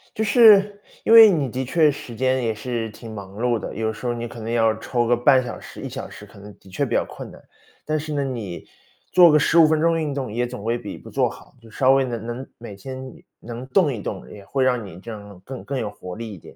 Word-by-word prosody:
就 220 - -1
是， 210 -3 +6 0.2
因 - - 0
为 225 -2 +10
你 145 -7 0
的 130 +3 -3
确 155 +3 +3
时 125 -4 -9
间 130 +1 0
也 115 - 0
是 115 +1 -4
挺 110 +2 -11
忙 100 -2 -9
碌 120 +2 0
的。 110 - -6
有 110 +1 -1
时 110 +3 -10
候 120 - 0
你 120 0 -5
可 115 - -10
能 115 +1 -5
要 115 -2 +2
抽 120 +1 -1
个 120 0 +3
半 130 +1 +4
小 120 - -7
时、 - - -11
1 - - -5
小 - - -6
时， - - -12
可 - - -15
能 100 +1 -12
的 95 - -18
确 95 - -1
比 - - -9
较 - - +2
困 - - -9
难。 - - -15 0.4
但 155 0 -1
是 155 0 -5
呢， 145 -1 0
你 115 -9 -5 0.5
做 175 -3 +7
个 150 - +5
15 165 +2 +5
分 155 0 +1
钟 165 0 +2
运 150 -3 -2
动 135 -5 -4
也 120 +2 -1
总 120 -3 -8
归 115 +2 0
比 - - -8
不 - - -13
做 - - +1
好， - - -12
就 115 -1 -17
稍 130 +4 +3
微 135 0 +4
地 125 - -6
能 115 - -9
能 120 +3 -6
每 115 -3 -9
天 130 +5 -9 0.2
能 120 +2 -8
动 175 -5 +3
一 115 -5 -5
动， - - -6
也 100 -2 -12
会 135 +4 -1
让 125 -4 +1
你 90 -2 -11
这 115 - -11
样 100 -4 -10
更 130 -2 -8
更 135 -2 -4
有 105 - -3
活 90 -3 -9
力 115 -1 -7
一 95 - -9
点， - - -15
120 Hz, 285 characters per minute, -22 LUFS, 110-140 Hz, 0.5 s, 为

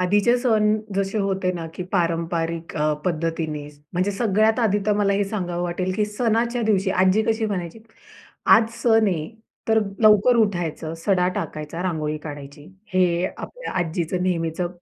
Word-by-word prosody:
आधीचे 205 +6 +3
सण 215 -4 +2 0.2
जसे 195 +2 -1
होते 195 -2 0
ना, 170 -2 -5
की 180 - -4
पारंपरिक 165 -2 -1
अ, 150 0 +1
पद्धतीने. 160 -3 -2 0.2
म्हणजे 185 +3 0
सगळ्यात 215 +2 +2
आधी 210 -3 +2
तर 210 - +4
मला 200 -1 +2
हे 200 +1 +1
सांगावं 180 -4 -3
वाटेल, 180 +1 -2
की 210 - +2
सणाच्या 230 +3 0
दिवशी 200 -3 +2
आजी 190 +3 +3
कशी 220 0 0
म्हणायची, 180 -2 -4 0.7
"आज 225 0 +6
सण 225 -2 +4
आहे. 160 -5 -2 0.4
तर 220 0 +4 0.2
लवकर 215 +2 +6
उठायचं, 175 -7 -1
सडा 180 +1 +1
टाकायचा, 155 +1 -5
रांगोळी 155 -4 -2
काढायची." 145 -1 -9 0.3
हे 180 -1 +2
आपल्या - - -7
आजीचं 175 +1 -1
नेहमीचं 175 -1 -1
185 Hz, 150 wpm, -23 LUFS, 165-215 Hz, 0.7 s, आज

